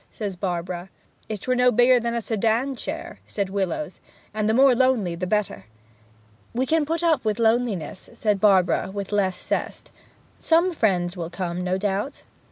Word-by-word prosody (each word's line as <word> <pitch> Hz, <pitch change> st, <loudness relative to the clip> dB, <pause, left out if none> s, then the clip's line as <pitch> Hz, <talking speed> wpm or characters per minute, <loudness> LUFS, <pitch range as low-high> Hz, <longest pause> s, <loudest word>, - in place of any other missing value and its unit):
says 205 Hz, -4 st, -4 dB
Barbara. 175 Hz, 0 st, -4 dB, 0.4 s
'If 215 Hz, -3 st, -4 dB
'twere 255 Hz, -, 0 dB
no 250 Hz, 0 st, +4 dB
bigger 245 Hz, +2 st, +5 dB
than 235 Hz, 0 st, -2 dB
a 235 Hz, -, -1 dB
sedan 230 Hz, +5 st, 0 dB
chair!' -, -, -6 dB
says 200 Hz, -2 st, -3 dB
Willowes. 195 Hz, -1 st, -2 dB, 0.3 s
'And 215 Hz, 0 st, 0 dB
the -, -, +3 dB
more 265 Hz, +1 st, +6 dB
lonely 245 Hz, -8 st, +2 dB
the 180 Hz, +2 st, -4 dB
better.' 205 Hz, -, -1 dB, 0.9 s
'We 255 Hz, +2 st, +1 dB
can 315 Hz, +2 st, +2 dB
put 330 Hz, +2 st, -1 dB
up 320 Hz, -6 st, +2 dB
with 215 Hz, -2 st, 0 dB
the 230 Hz, -, 0 dB
loneliness,' 220 Hz, -8 st, 0 dB
said 210 Hz, -4 st, 0 dB
Barbara, 190 Hz, -4 st, +3 dB
with 200 Hz, 0 st, -5 dB
less 190 Hz, -3 st, 0 dB
zest. -, -, -4 dB, 0.5 s
'Some 340 Hz, +3 st, +3 dB
friends 180 Hz, -, +1 dB
will 170 Hz, -2 st, -5 dB
come, 175 Hz, 0 st, -4 dB
no 185 Hz, +1 st, 0 dB
doubt.' 205 Hz, +7 st, -2 dB
210 Hz, 175 wpm, -24 LUFS, 185-245 Hz, 0.9 s, more